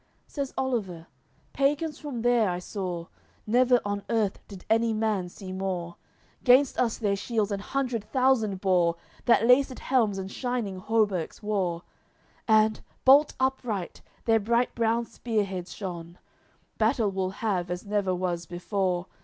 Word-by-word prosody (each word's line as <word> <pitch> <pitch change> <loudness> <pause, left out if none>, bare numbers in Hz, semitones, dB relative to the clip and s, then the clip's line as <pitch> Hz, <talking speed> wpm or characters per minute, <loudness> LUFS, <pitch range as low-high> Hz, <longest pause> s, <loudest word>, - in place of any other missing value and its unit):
LXXXII - - -27
Says 280 -3 -3
Oliver: 200 -11 -2 0.5
"Pagans 295 +3 0
from 260 -6 -5
there 240 -4 +3
I 175 - -1
saw; 180 -2 -4 0.4
Never 245 +2 +4
on 205 0 -2
earth 215 -4 0
did 195 -3 -11
any 225 +1 +2
man 215 -4 0
see 185 +1 -9
more. 185 -2 -3 0.5
Gainst 255 +2 +5
us 235 -3 +1
their 205 -3 0
shields 215 0 -1
an 200 - -1
hundred 245 0 -2
thousand 225 -5 +1
bore, 180 -3 +3 0.3
That 235 -1 +4
laced 255 +1 +4
helms 225 -7 +1
and 190 0 -5
shining 240 -7 -3
hauberks 205 -4 0
wore; 185 -5 -1 0.6
And, 215 -1 +4 0.2
bolt 285 +3 +6
upright, 250 -8 -2 0.2
their 225 -1 +4
bright 235 +3 +1
brown 230 0 +1
spearheads 200 -7 -3
shone. 175 -3 -7 0.6
Battle 220 -2 +2
we'll 190 -1 -1
have 190 -3 -2
as 180 +2 -4
never 200 -2 0
was 175 -2 -2
before. 180 0 -1
210 Hz, 145 wpm, -27 LUFS, 185-240 Hz, 0.6 s, bolt